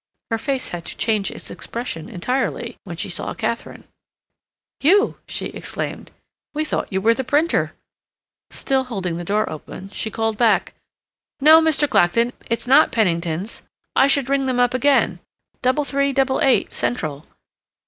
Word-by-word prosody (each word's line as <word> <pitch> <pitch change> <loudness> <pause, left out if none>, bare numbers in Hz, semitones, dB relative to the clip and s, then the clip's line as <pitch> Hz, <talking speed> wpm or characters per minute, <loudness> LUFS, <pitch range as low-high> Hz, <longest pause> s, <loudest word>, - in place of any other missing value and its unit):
Her 225 - 0
face 270 +1 -2
had 175 -1 -6
to - - -7
change 215 -3 +1
its - - -9
expression 230 -7 -6
entirely 235 +3 -2
when 170 -3 -7
she 205 +4 -1
saw 175 - -3
Katharine. 230 0 -4 1.0
"You!" 395 +8 +3
she - - -3
exclaimed. - - -5 0.5
"We 310 +1 0
thought - - -3
you 190 - 0
were 225 +4 +4
the 265 - -3
printer." 305 +5 +1 0.7
Still 265 -1 0
holding 190 -8 -3
the 175 - -5
door 210 +4 0
open, 185 +5 -8
she 220 - -3
called 225 0 -1
back, 235 -2 +3 0.7
"No, 310 +3 +8
Mr. 310 -2 +3
Clacton, 230 +1 +3 0.2
it's 230 0 -1
not 275 +5 +5
Penningtons. 175 -2 -1 0.3
I 270 - +5
should 275 -2 +2
ring 275 0 +1
them 255 -1 0
up 245 0 +3
again—double 265 0 0
three 280 0 0
double 265 0 +1
eight, 265 -2 +3
Central. 155 - -2
240 Hz, 150 wpm, -21 LUFS, 200-275 Hz, 1.0 s, No